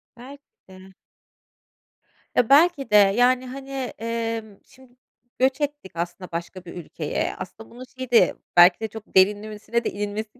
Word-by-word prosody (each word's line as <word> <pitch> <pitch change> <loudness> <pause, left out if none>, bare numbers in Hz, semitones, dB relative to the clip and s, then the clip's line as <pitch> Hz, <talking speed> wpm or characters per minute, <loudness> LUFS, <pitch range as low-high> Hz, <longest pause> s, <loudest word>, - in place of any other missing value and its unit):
Belki 275 +4 -13 0.3
de. 190 0 -15 1.4
Ya, 245 -1 +2
belki 295 0 +4
de, - - +4
yani, 245 +6 +4
hani, 270 +2 -9 0.3
emm, 225 -2 -4
şimdi 255 -2 -21 0.4
göç 260 +3 +1
ettik 290 -8 -4
aslında 175 +2 -5
başka 175 +2 -6
bir 170 - -9
ülkeye. 150 -3 -3
Aslında 220 +4 -10
bunu 245 +2 -11
şey 255 -1 -6
de 235 - +5 0.2
belki 175 +1 +7
de 220 - -3
çok 220 -1 -12
derinlemesine 210 +4 +1
de - - -1
inilmesi 210 +3 -5
225 Hz, 145 wpm, -23 LUFS, 195-255 Hz, 1.4 s, belki